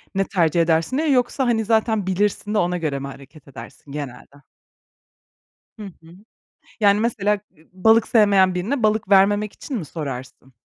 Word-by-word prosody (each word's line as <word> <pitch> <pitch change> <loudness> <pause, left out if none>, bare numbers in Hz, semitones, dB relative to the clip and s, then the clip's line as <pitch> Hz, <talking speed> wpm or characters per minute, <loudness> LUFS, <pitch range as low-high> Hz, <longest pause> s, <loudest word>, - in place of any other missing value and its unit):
ne 195 0 +1
tercih 170 -3 +1
edersin 165 +8 +1
diye? 315 +1 0
Yoksa, 255 +1 +1
hani, 225 -2 0
zaten 220 -2 +1
bilirsin 205 +2 -1
de - - +1
ona 180 -2 0
göre 150 -5 -3
mi 140 - -6
hareket 140 +2 -14
edersin 140 +1 -12
genelde? 140 0 -9 1.4
Hı - - -7
hı. 170 -3 -14 0.7
Yani, 205 0 +4
mesela, 210 -3 0 0.2
eee, 160 +1 -24
balık 220 +4 +3
sevmeyen 200 -4 +4
birine 225 +9 -2
balık 215 -2 +1
vermemek 205 +2 +3
için 275 - -7
mi 195 - -4
sorarsın? 135 -4 -8
195 Hz, 160 wpm, -21 LUFS, 160-215 Hz, 1.4 s, Yani